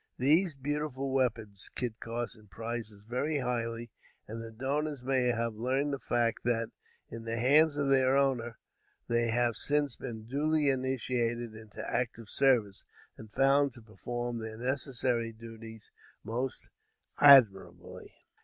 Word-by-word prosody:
These 155 +6 +3
beautiful 140 -1 -3
weapons, 110 -6 -1
Kit 120 -2 -4
Carson 115 -2 -5
prizes 110 0 -6
very 140 +6 -1
highly; 120 -3 -3 0.4
and, 115 +2 -6
the 115 - -7
donors 140 +4 -3
may 130 -1 +1
here 115 -1 +1
learn 130 +6 -1
the 140 - -3
fact 120 -3 0
that, 115 -1 0 0.4
in 115 0 -7
the 115 0 -3
hands 145 +5 +4
of 145 -1 0
their 130 0 +4
owner, 125 -5 0 0.5
they 120 0 +1
have 120 0 +1
since 145 +2 +1
been 110 -2 -7
duly 145 +4 +1
initiated 125 -3 -1
into 110 0 -9
active 115 -2 -3
service, 120 -8 +2 0.3
and 110 -1 -12
found 135 +1 +3
to 120 -2 -11
perform 120 +2 -5
their 110 0 -7
necessary 125 -2 -1
duties 115 -1 -12 0.3
most 125 +4 -4 0.5
admirably. 125 -10 +5
120 Hz, 135 wpm, -30 LUFS, 115-135 Hz, 0.5 s, admirably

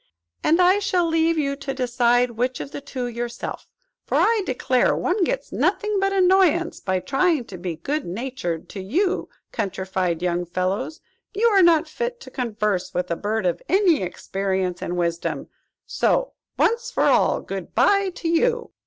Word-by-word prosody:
And 330 +3 +3
I 365 +2 +5
shall 365 -3 +1
leave 325 0 +2
you 280 -2 0
to 270 -1 -5
decide 245 -1 +2
which 245 +2 -2
of 280 - -6
the - - -6
two, 265 -3 -5
yourself; 240 0 -5 0.4
for, - - -3
I 450 -1 +3
declare, 255 0 +2
one 365 +2 0
gets - - -2
nothing 420 -2 0
but 390 0 +1
annoyance 365 -3 +3
by 185 -1 -1
trying 270 - +1
to 190 - -9
be 175 -2 -4
good 290 - -2
natured 180 -4 -4
to 200 - -7
you 350 - 0 0.2
countrified 190 -4 -2
young 175 0 0
fellows. 190 - -2 0.3
You 435 +4 +1
are 400 -3 +5
not 335 -2 +5
fit 480 +9 -4
to - - -11
converse 210 -6 -2
with 180 0 -1
a - - +1
bird 210 +2 -2
of 175 -2 0
any 370 - +4
experience 190 0 -2
and 180 - -3
wisdom. 170 -1 -2 0.4
So, - - +1 0.2
once 465 +1 +1
for - - 0
all, - - +3
good - - -7
bye 395 -1 +4
to 335 - -4
you!" 470 +8 +1
260 Hz, 170 wpm, -23 LUFS, -, 0.4 s, I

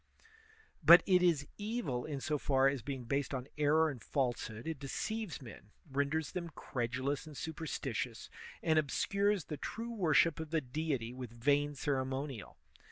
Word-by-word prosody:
But 170 +1 +10
it 180 -2 +5
is 165 -5 +3
evil 205 - -2
in 140 -3 -4
so 150 0 -1
far 135 -1 +3
as 135 -2 0
being 135 0 -5
based 140 +2 -1
on 130 0 -4
error 155 +2 +4
and 125 -5 -9
falsehood, 120 -4 -2
it 160 -3 -3
deceives 190 +5 -3
men, 110 -3 -11 0.2
renders 145 +3 0
them 170 -2 -4
credulous 130 +5 -2
and 150 -3 -10
superstitious, 140 -7 -4 0.4
and 160 -1 +4
obscures 200 +6 +1
the 150 - -6
true 230 +8 -5
worship 165 -5 +3
of 160 -1 -5
the 160 +1 +2
Deity 135 -3 -2
with 125 -2 -6
vain 145 +5 +1
ceremonial. 135 -3 -2
145 Hz, 155 wpm, -34 LUFS, 130-160 Hz, 0.4 s, But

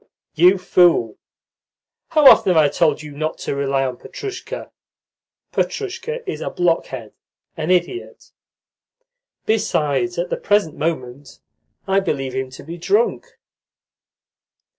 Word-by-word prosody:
"You 180 +4 +5
fool! 175 - +3 0.9
How 305 -2 +3
often 185 -8 +7
have - - +3
I 150 -2 +5
told 155 0 +1
you 150 - -9
not 155 +2 -3
to - - -2
rely 135 -1 0
on 125 -2 -4
Petrushka? 420 +4 -7 0.8
Petrushka 465 +4 -3
is - - -4
a - - -3
blockhead, 150 -10 -1 0.4
an 160 +1 -4
idiot. 185 - -1 1.1
Besides, 180 -6 0
at 175 +1 -2
the - - 0
present 205 -7 +1
moment 140 -3 -4 0.5
I 195 0 +3
believe 135 -9 -2
him 130 0 -3
to 130 - -12
be 170 +4 -8
drunk." 415 - 0
170 Hz, 120 wpm, -20 LUFS, 140-200 Hz, 1.1 s, often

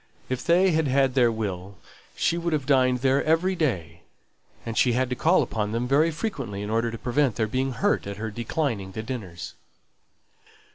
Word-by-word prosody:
If 130 -1 -2
they 180 +2 +4
had 160 -2 +1
had 135 0 +2
their 125 -3 +4
will 100 -3 -5 0.4
she 175 - +1
would 170 -1 -2
have 145 -3 -1
dined 130 -3 +3
there 135 +1 +2
every 165 +4 +2
day; 120 - -2 0.6
and 115 - -4
she 125 +1 +3
had 130 +1 0
to - - 0
call 165 +8 +3
upon 105 -1 -3
them 120 +2 -1
very 145 +5 +3
frequently 140 - -4
in 105 - -4
order 115 +1 +1
to 115 - -6
prevent 125 +1 +1
their 110 - +1
being 130 +4 -1
hurt 205 - 0
at 100 0 -5
her 110 +1 -4
declining 115 -4 -2
the 110 - -5
dinners. 100 -8 -6
125 Hz, 190 wpm, -25 LUFS, 110-150 Hz, 0.6 s, they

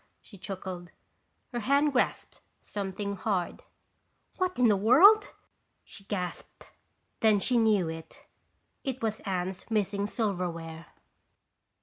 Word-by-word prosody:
she 210 - -16
chuckled. 185 -2 -7 0.6
Her 240 - -1
hand 280 +5 +2
grasped 255 - -1 0.2
something 200 0 -4
hard. 185 -4 -2 0.8
"What 370 -1 -1
in 250 -1 +5
the 210 - +5
world?" 335 - +6 0.5
she 195 - -13
gasped. 180 -4 -6 0.5
Then 215 -2 +4
she 245 +4 +2
knew. 210 -6 +3
It 195 +9 -9
was 220 -1 -1
Anne's 185 +1 -3
missing 205 -2 0
silverware. 170 -7 -3
205 Hz, 105 wpm, -29 LUFS, 185-235 Hz, 0.8 s, world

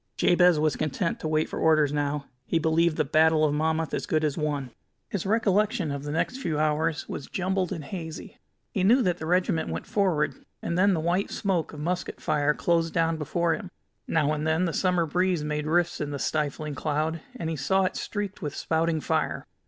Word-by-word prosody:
Jabez 175 -2 +4
was 155 0 +2
content 155 +3 -1
to - - -3
wait 155 0 +1
for - - -5
orders 155 -3 +3
now. 145 -1 -1 0.2
He - - +1
believed 160 +1 +2
the - - +2
Battle 155 +2 +4
of 145 - +1
Monmouth 160 +1 0
as - - -2
good 155 0 +1
as 150 -2 +1
won. 145 -5 -2 0.4
His 195 -2 -3
recollection 210 -5 +2
of 140 -1 -3
the 145 +1 -5
next 165 - -1
few 165 - -2
hours 155 +1 0
was 140 - -6
jumbled 185 0 -1
and 160 - -4
hazy. 160 0 -7 0.3
He 190 - -1
knew 240 +7 +5
that 180 -3 0
the 160 - -5
regiment 175 - +1
went 80 +1 -4
forward, 160 -8 +1 0.3
and 170 - -3
then 195 +1 +4
the - - -1
white 175 +5 0
smoke 185 -5 -1
of 150 - -8
musket 180 +3 -3
fire 150 0 +1
closed 165 -1 +1
down 165 -1 +2
before 165 +3 0
him. 190 0 -5 0.4
Now 155 -2 +2
and 155 +1 -2
then 160 +3 +2
the 165 - -2
summer 180 -1 +2
breeze 180 +1 +1
made 150 0 -2
rifts 175 +2 +1
in 150 - -2
this 140 -2 -3
stifling 150 0 -2
cloud, 155 +3 -1
and 170 -10 -4
he - - -2
saw 190 +8 +1
it 185 - -1
streaked 205 -2 -4
with 145 - -4
spouting 160 -1 0
fire. - - -1
160 Hz, 205 wpm, -26 LUFS, 150-180 Hz, 0.4 s, knew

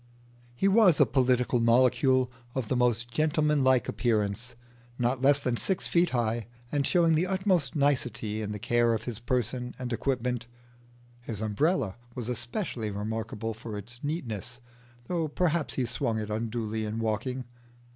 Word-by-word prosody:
He 195 - +2
was 195 -5 +5
a - - +7
political 125 -2 +2
molecule 130 +2 +3 0.2
of 130 -5 -2
the - - +1
most 120 -1 +1
gentleman 150 0 +2
like 130 -1 +3
appearance, 115 +1 -1 0.4
not 125 +1 0
less 140 +1 +5
than 125 -4 -1
six 190 +7 0
feet 175 0 +3
high, 115 -2 -1 0.2
and 145 -2 +1
showing 170 -2 +4
the 165 +4 +2
utmost 185 -7 +1
nicety 125 -7 0
in 105 -1 -3
the 105 - -3
care 120 +2 +2
of - - -4
his 120 -3 -5
person 125 0 -2
and 125 -1 -4
equipment. 125 -1 -1 0.7
His 115 -3 -6
umbrella 110 - 0 0.2
was 125 -2 -4
especially 120 - -3
remarkable 110 +2 -3
for 110 -1 -7
its 120 +6 -9
neatness, 120 - -4 0.5
though 165 0 -1
perhaps 165 0 0
he 130 - 0
swung 115 -1 -1
it 105 -1 -4
unduly 110 0 -2
in 110 +1 -3
walking. 115 +4 -2
125 Hz, 155 wpm, -28 LUFS, 115-140 Hz, 0.7 s, a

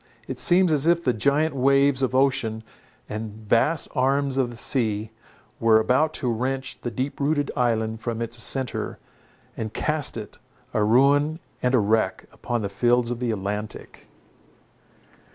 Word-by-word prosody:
It - - -5
seems 180 -1 +5
as 150 0 +1
if 170 0 +3
the 125 - +1
giant 140 +6 +1
waves 135 +1 +3
of 130 -1 0
ocean, 130 -5 +1 0.4
and 105 0 -6
vast 145 +9 +2
arms 135 0 +1
of 130 -2 +1
the 120 - -10
sea, 110 -4 0 0.5
were 115 -1 +5
about 130 +7 +2
to 125 -4 -1
wrench 130 +3 -3
the 120 - -3
deep 130 +5 -4
rooted 145 0 0
island 110 -2 -1
from 115 -2 -4
its 115 0 -2
centre; 130 +1 0 0.6
and 110 -1 -6
cast 155 -5 +1
it, 105 -2 -9 0.3
a 105 - +1
ruin 140 +7 +3 0.2
and 125 +1 +2
a - - +4
wreck, 105 -2 0
upon 120 -2 -4
the - - -1
fields 120 +3 +1
of 120 - -4
the 125 -1 -2
Atlantic. 105 0 -5
125 Hz, 155 wpm, -24 LUFS, 110-140 Hz, 0.6 s, seems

